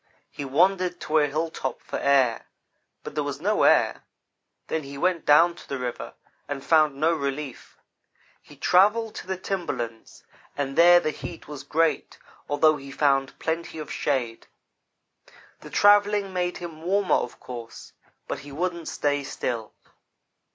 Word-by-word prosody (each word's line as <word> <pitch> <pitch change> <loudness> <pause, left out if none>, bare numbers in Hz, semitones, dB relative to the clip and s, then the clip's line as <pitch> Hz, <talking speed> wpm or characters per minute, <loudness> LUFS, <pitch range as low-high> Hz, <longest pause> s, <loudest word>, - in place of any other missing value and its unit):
He - - -6
wan 180 +8 +3
dered 180 -1 -2
to 155 +1 +2
a 145 - +3
hilltop 150 -3 -3
for - - -5
air; 135 -4 +2 0.6
but - - -7
there 150 - -1
was 145 -1 -4
no 210 +6 +1
air. - - +3 0.6
Then 160 - -2
he 140 -1 -9
went 180 +2 0
down 165 +4 +6
to - - -15
the 140 - -2
river 125 -1 -5 0.3
and 140 -1 -5
found 155 -3 +4
no 155 +4 +2
relief. 140 -3 -5 0.6
He 145 - -16
travelled 210 +9 +3
to - - -8
the 190 -1 -2
timberlands, 125 - -5 0.3
and 135 -1 -2
there 175 +1 +7
the 155 - -1
heat 165 +2 -9
was 145 -2 -7
great, 165 +1 0 0.3
although 155 +1 +4
he 140 -1 -10
found 135 -1 +1
plenty 165 0 -3
of 155 - -7
shade. 125 -5 -2 1.1
The - - -12
travelling 205 -1 +4
made 180 -1 -1
him 165 -3 -8
warmer, 195 +3 +1
of 120 - -1
course, 120 -2 -9 0.3
but - - -4
he 145 0 -11
wouldn't 170 +2 -3
stay 145 -1 -1
still. 120 -5 -4
155 Hz, 155 wpm, -25 LUFS, 140-175 Hz, 1.1 s, there